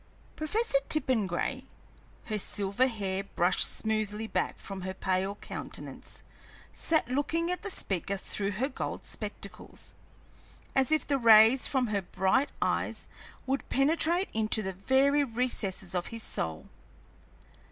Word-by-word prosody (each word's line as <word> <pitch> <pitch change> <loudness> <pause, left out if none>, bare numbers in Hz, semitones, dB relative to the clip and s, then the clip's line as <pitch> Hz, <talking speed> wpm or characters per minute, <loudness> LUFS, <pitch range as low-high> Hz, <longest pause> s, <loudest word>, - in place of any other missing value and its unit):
Professor 310 0 +1
Tippengray, 225 - +1 0.6
her 215 -2 -2
silver 200 +5 +1
hair 195 -5 -2
brushed 180 -2 +2
smoothly 215 0 -1
back - - -1
from 195 -1 -6
her 190 +1 -4
pale 190 +1 -1
countenance, - - -7 0.5
sat 320 -5 +1
looking 305 +7 0
at 360 - -1
the 410 - -4
speaker 200 - -1
through 200 +1 -1
her 245 +8 0
gold 280 - -5
spectacles, - - -6 0.8
as 270 +2 +2
if 310 - +2
the 280 -2 +1
rays 225 +2 +7
from 260 -3 +1
her 210 -3 -1
bright 190 +9 +1
eyes - - -1 0.4
would 270 +1 -2
penetrate 330 +6 +2
into 220 0 +2
the 190 -1 -3
very 270 +9 +3
recesses 225 -7 -2
of 180 -1 -1
his 230 -1 -6
soul. 80 -1 -3
225 Hz, 130 wpm, -30 LUFS, 195-275 Hz, 0.8 s, rays